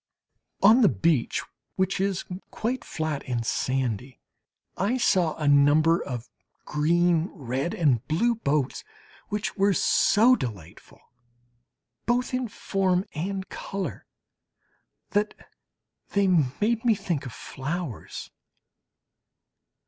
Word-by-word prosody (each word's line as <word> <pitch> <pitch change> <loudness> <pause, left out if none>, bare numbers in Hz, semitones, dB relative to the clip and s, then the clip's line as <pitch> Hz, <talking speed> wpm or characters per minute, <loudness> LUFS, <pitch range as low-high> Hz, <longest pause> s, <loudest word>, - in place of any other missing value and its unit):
On 220 +6 +7
the 215 - +6
beach, 125 - +1 0.3
which 190 0 0
is 195 -2 -1 0.2
quite 240 +2 -3
flat 155 -7 -3
and 120 -2 -2
sandy, 130 -1 -2 0.6
I 210 +7 0
saw 180 -9 +2
a 150 - -2
number 145 +4 +5
of 125 -2 -5 0.4
green, 170 +2 +2
red 135 0 -3
and 135 -9 +2
blue 225 +10 +2
boats, 150 - -1 0.5
which 210 0 -2
were 200 0 +3
so 230 +9 +4
delightful 100 - -8 1.1
both 250 +1 +1
in 255 -1 0
form 190 -3 0
and 190 +4 -3
colour, 195 -1 -5 1.0
that 210 +1 0 0.8
they 200 -1 +3
made 185 - +1
me 235 -3 +4
think 175 -9 -3
of - - -7
flowers. 145 - -6
170 Hz, 105 wpm, -26 LUFS, 140-200 Hz, 1.1 s, On